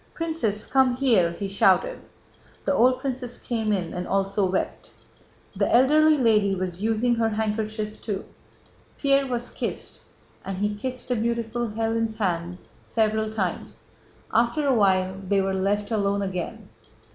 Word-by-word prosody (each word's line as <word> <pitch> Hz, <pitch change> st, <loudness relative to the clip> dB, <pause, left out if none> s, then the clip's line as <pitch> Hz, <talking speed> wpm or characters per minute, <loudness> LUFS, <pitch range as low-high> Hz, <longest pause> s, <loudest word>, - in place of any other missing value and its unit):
"Princess, 315 Hz, -, -1 dB
come 260 Hz, -2 st, +3 dB
here!" 225 Hz, -11 st, +3 dB
he 200 Hz, +3 st, -4 dB
shouted. 350 Hz, -, +2 dB, 0.7 s
The -, -, +2 dB
old 255 Hz, +2 st, +4 dB
princess 255 Hz, -2 st, -4 dB
came 220 Hz, -3 st, -2 dB
in 180 Hz, -5 st, -1 dB
and 180 Hz, 0 st, -4 dB
also 195 Hz, 0 st, +1 dB
wept. 185 Hz, -, -3 dB, 0.7 s
The -, -, 0 dB
elderly 305 Hz, +5 st, +5 dB
lady 210 Hz, -6 st, +3 dB
was 185 Hz, -1 st, -4 dB
using 225 Hz, +3 st, +2 dB
her 225 Hz, -1 st, +2 dB
handkerchief 215 Hz, 0 st, -3 dB
too. 205 Hz, -3 st, -4 dB, 0.7 s
Pierre 275 Hz, -1 st, +2 dB
was 245 Hz, -1 st, -3 dB
kissed, -, -, -5 dB, 0.4 s
and 195 Hz, -1 st, -5 dB
he 205 Hz, +2 st, 0 dB
kissed 255 Hz, +5 st, -5 dB
the 250 Hz, -, +2 dB
beautiful 235 Hz, +1 st, -1 dB
Hélène's 225 Hz, 0 st, -1 dB
hand 175 Hz, -4 st, -1 dB, 0.2 s
several 220 Hz, -1 st, 0 dB
times. 195 Hz, -5 st, -4 dB, 0.5 s
After 235 Hz, +6 st, +2 dB
a 270 Hz, -, +4 dB
while 190 Hz, -4 st, +2 dB
they 200 Hz, +1 st, +2 dB
were 195 Hz, 0 st, 0 dB
left 205 Hz, +2 st, 0 dB
alone 200 Hz, -2 st, +1 dB
again. 185 Hz, -3 st, -5 dB
220 Hz, 145 wpm, -25 LUFS, 195-240 Hz, 0.7 s, elderly